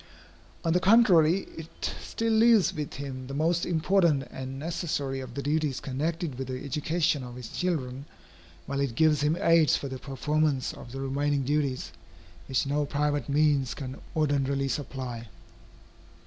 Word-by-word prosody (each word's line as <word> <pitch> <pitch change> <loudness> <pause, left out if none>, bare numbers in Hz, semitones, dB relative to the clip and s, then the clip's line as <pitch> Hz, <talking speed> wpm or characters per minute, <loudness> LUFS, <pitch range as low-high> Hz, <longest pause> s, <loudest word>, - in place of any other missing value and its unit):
On 165 - +3
the 180 - +4
contrary, 185 -4 +5
it 160 0 -5
still 225 0 -1
leaves 225 -2 +5
with 150 -2 -5
him 130 -2 -6
the 135 - -6
most 165 +3 +1
important 165 -3 +2
and 130 0 -6
necessary 145 -3 -2
of 125 -2 -8
the 140 - -3
duties 150 -2 0
connected 150 +1 -3
with 135 - -3
the 130 0 -5
education 150 +1 0
of 120 -1 -8
his 125 -3 -8
children, 140 -7 -2 0.6
while 140 - -3
it 140 -4 -1
gives 155 +1 +3
him 150 +3 +2
aids 165 -2 +5
for 140 - -4
the 130 -1 -6
performance 145 +1 0
of 120 - -11
the 135 - -6
remaining 140 +1 0
duties, 140 - -1 0.6
which 130 +1 +1
no 145 +2 0
private 145 -2 -1
means 145 -3 +2
can 130 -3 -6 0.2
ordinarily 140 -3 +1
supply. 125 -4 -4
145 Hz, 155 wpm, -28 LUFS, 135-160 Hz, 0.6 s, contrary